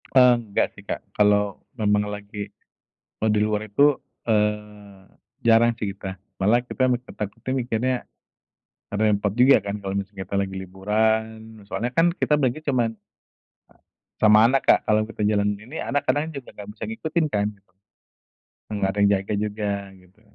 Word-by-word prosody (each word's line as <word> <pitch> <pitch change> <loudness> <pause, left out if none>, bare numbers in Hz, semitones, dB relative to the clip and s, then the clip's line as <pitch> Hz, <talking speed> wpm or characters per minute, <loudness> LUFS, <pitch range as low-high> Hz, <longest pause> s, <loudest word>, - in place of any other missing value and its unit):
Enggak 120 -5 +3
sih, - - -13
Kak, - - -5
kalau 105 -1 +2 0.2
memang 105 -1 +1
lagi 105 0 -6 0.7
kalau 110 - +2
di 105 0 +2
luar 105 0 -1
itu, 145 +8 +4 0.3
eee, 105 -2 -2 0.4
jarang 115 +1 +5
sih 105 - -2
kita. 95 -1 -7 0.2
Malah 110 +5 +4
kita 130 0 +1
mi 125 - +2
takutnya 115 0 -6
mikirnya, 125 0 0 1.0
karna 105 +2 0
ya - - +4
repot 100 0 -1
juga 130 +3 +7
kan, 100 0 -3
kalau 95 -1 -4
misalnya 100 -1 -4
kita 100 - -4
lagi 95 -1 -4
liburan. 105 +4 0 0.4
Soalnya 105 +4 -3
kan 170 +1 +4
kita 170 -3 0
berangkat 145 +1 0
cuman 120 -5 +1 1.3
Sama 110 +1 +7
anak, 130 +3 +3
Kak, - - +7
kalau 105 0 +3
kita 105 -2 -2
jalan 105 -1 +1
ini 120 +10 -8
anak 145 +1 -1
kadang 150 +2 +1
juga 140 -5 -9
nggak 105 0 -10
bisa - - -5
ngikutin 170 -7 -1
kan 105 -8 0
gitu. 95 -2 -35 1.0
Enggak 100 -2 0
ada - - -9
yang 100 - +5
jaga 95 +2 -4
juga 105 0 -2 0.2
gitu. 95 +2 -21
105 Hz, 160 wpm, -24 LUFS, 100-125 Hz, 1.3 s, juga